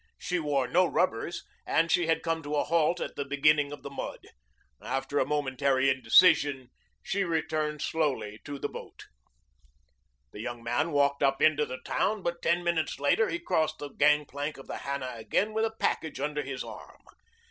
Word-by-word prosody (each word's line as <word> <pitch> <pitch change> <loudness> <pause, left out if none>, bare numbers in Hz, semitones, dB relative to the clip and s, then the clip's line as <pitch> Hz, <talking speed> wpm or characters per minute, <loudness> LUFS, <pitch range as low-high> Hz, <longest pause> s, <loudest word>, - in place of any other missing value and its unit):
She 180 -1 -2
wore 145 -5 0
no 180 +8 +3
rubbers 170 -2 -1 0.2
and 165 0 +1
she 175 -2 +3
had 165 - +1
come 165 -1 -1
to 150 0 -4
a 145 - +2
halt 170 +2 +2
at - - -5
the 140 - -2
beginning 145 +1 +2
of 145 - -9
the - - -6
mud. 140 - -5 0.6
After 140 +2 -2
a 130 - +1
momentary 135 -2 +1
indecision 130 0 +4 0.3
she 195 0 0
returned 155 -3 -1
slowly 135 -9 -1
to 145 -1 -5
the - - -2
boat. - - -10 1.3
The 105 - -8
young 120 +1 -6
man 145 +8 0
walked 140 -1 +2
up 135 -1 +2
into 150 -1 +3
the 130 - -7
town, 205 0 0
but 170 0 -2
ten 170 +1 +1
minutes 170 -3 0
later 145 +10 +2
he - - -1
crossed 160 - 0
the 145 - -6
gangplank 145 0 +1
of 135 - -11
the - - -6
Hannah 140 -2 -4
again 150 - 0
with 220 +1 +1
a 220 0 -4
package 160 -4 -1
under 150 +1 -1
his 135 -2 -5
arm. - - -11
145 Hz, 180 wpm, -29 LUFS, 135-165 Hz, 1.3 s, indecision